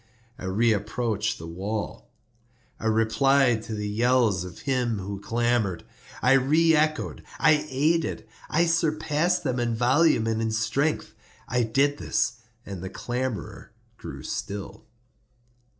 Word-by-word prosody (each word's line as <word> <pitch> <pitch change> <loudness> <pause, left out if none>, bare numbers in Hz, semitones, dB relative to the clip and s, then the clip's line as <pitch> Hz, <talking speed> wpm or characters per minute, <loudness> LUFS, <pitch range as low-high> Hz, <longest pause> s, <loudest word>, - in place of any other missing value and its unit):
I - - -7
reapproached 110 +2 0
the 80 - -9
wall. 95 - -5 0.7
I 110 - -2
replied 115 +2 +3
to 115 -2 -4
the 105 0 -3
yells 115 -3 +2
of 90 -1 -9
him 125 -5 0
who 100 0 -5
clamored. 115 -5 0 0.4
I 125 - +5
re 155 +5 +4
echoed—I 155 0 +1
aided—I 150 0 0
surpassed 165 +1 +1
them 130 -4 -1
in 120 -1 0
volume 125 +1 +3
and 110 0 0
in 115 - 0
strength. 115 +8 -1 0.3
I 125 0 +1
did 135 +6 +1
this, 120 0 0 0.3
and 95 -3 -7
the 95 - -5
clamorer 125 +2 -4 0.3
grew - - -8
still. 100 - -5
120 Hz, 120 wpm, -26 LUFS, 105-140 Hz, 0.7 s, I